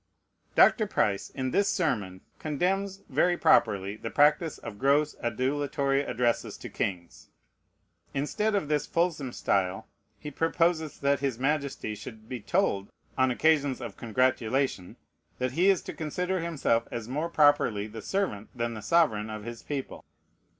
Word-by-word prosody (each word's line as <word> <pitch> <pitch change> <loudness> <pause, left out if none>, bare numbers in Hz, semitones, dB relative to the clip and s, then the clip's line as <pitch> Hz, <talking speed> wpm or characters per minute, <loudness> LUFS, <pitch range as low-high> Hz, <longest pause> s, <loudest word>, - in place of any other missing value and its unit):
Dr. 215 -3 +5
Price, 100 - 0
in 130 -1 -3
this 200 +6 +2
sermon, 105 - -1 0.2
condemns, 190 +6 -1
very 175 +6 +2
properly, 100 - +3
the 115 - -5
practice 150 +4 +3
of 100 - -9
gross 145 +2 +2
adulatory 140 +3 0
addresses 120 -4 -1
to - - -8
kings. 90 -4 -4 0.8
Instead 210 +10 -1
of 195 -7 0
this 150 -1 0
fulsome 165 -6 0
style, 95 -4 -1 0.3
he 150 - -8
proposes 165 0 0
that 140 0 +2
his 135 -4 -1
Majesty 140 -4 -1
should 110 +1 -10
be 125 0 -5
told, 100 - 0 0.3
on 130 0 +3
occasions 145 0 +2
of 115 -5 -7
congratulation, 125 -3 0 0.4
that 125 0 -1
"he 180 +8 +3
is 195 -3 +3
to - - -6
consider 180 +4 -2
himself 145 -9 0
as 115 -2 -5
more 150 +7 -2
properly 145 -10 +3
the 110 +1 -8
servant 190 - -2
than 120 -1 -2
the 110 - -7
sovereign 110 -11 +2
of 110 -1 -6
his 115 +1 -7
people." 140 -3 -5
135 Hz, 145 wpm, -28 LUFS, 115-160 Hz, 0.8 s, Dr